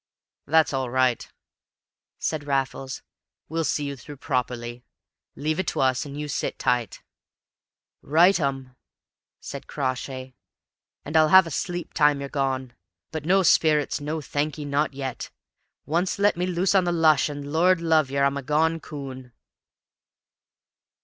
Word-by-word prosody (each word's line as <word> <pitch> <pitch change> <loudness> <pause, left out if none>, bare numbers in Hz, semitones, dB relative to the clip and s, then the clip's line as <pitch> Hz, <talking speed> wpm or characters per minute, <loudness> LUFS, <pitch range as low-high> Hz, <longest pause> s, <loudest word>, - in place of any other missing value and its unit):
"That's 160 0 +3
all 130 -2 -1
right," 130 -1 +1 0.9
said 155 -2 -3
Raffles. 135 -1 -2 0.5
"We'll 165 +1 -1
see 150 -1 -1
you 140 0 -4
through 145 +2 -11
properly. 125 -3 -3 0.5
Leave 155 +3 -2
it 190 - -1
to - - -1
us, 130 0 +1
and 145 +1 -7
you 150 - -4
sit 145 - -3
tight." 120 -4 -1 1.0
"Rightum!" 140 -6 +2 0.6
said - - -8
Crawshay. 130 -1 -4 0.7
"And 155 - -6
I'll 155 -1 +6
have 190 +3 +7
a 165 - -7
sleep 175 +3 -4
time 150 -2 +3
you're 140 0 -5
gone. 130 -3 -2 0.4
But 155 -2 -5
no 190 +3 +4
sperrits 150 -4 +3
no, 155 +2 -3
thank'ee 150 +1 -3
not 145 0 0
yet! 135 -2 -5 0.6
Once 170 +6 0
let 205 +1 +3
me 180 +1 -1
loose 180 +2 +1
on 190 -2 +4
the 175 - +1
lush, 160 -3 +4
and, 145 0 -6
Lord 180 +2 +4
love 160 -4 +2
yer, 140 0 0
I'm 140 0 +2
a - - -3
gone 160 +4 +1
coon!" 130 -5 -8
145 Hz, 145 wpm, -25 LUFS, 135-160 Hz, 1.0 s, have